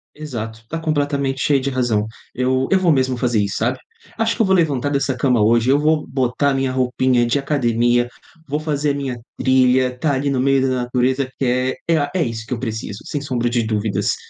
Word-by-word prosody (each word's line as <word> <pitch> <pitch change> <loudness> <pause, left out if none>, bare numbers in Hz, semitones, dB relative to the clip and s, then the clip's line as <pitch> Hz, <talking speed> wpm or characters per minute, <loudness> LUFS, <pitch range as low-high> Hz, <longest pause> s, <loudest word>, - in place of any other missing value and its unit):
Exato, 115 -7 -6
tá 165 - -3
completamente 145 -3 -1
cheia 140 -2 +3
de 140 +1 -2
razão. 120 -5 0 0.3
Eu 130 +1 +1
eu 190 - +6
vou 180 -2 +3
mesmo 130 -3 +2
fazer 120 -3 +1
isso, 100 -2 -1
sabe? 120 +3 0 0.4
Acho 225 0 +1
que 230 - +2
eu - - +2
vou 190 - +3
levantar 145 -6 +1
dessa 140 -2 0
cama 125 -3 +2
hoje 115 +3 +3
eu 140 - +4
vou 155 +1 +1
botar 135 +2 0
minha 135 -1 0
roupinha 130 -1 +2
de 120 +4 +1
academia. 120 -4 +1 0.4
Vou 145 +2 -1
fazer 150 -1 -1
a - - +1
minha 135 -3 -3 0.2
trilha, 130 0 +3
está 140 +3 0
ali 140 +2 0
no 135 -2 0
meio 135 0 +3
da 135 - +1 0.2
natureza, 130 +2 0
que - - -1 0.4
é 165 -1 +3
a, 145 -1 -1
é - - +1
é - - +3
isso 115 -2 -5
que - - -8
eu - - -6
preciso, 110 -4 -4
sem 145 - -3
sombra 125 -4 -1
de 120 -1 +1
dúvidas. 110 -1 0
130 Hz, 220 wpm, -20 LUFS, 120-145 Hz, 0.4 s, eu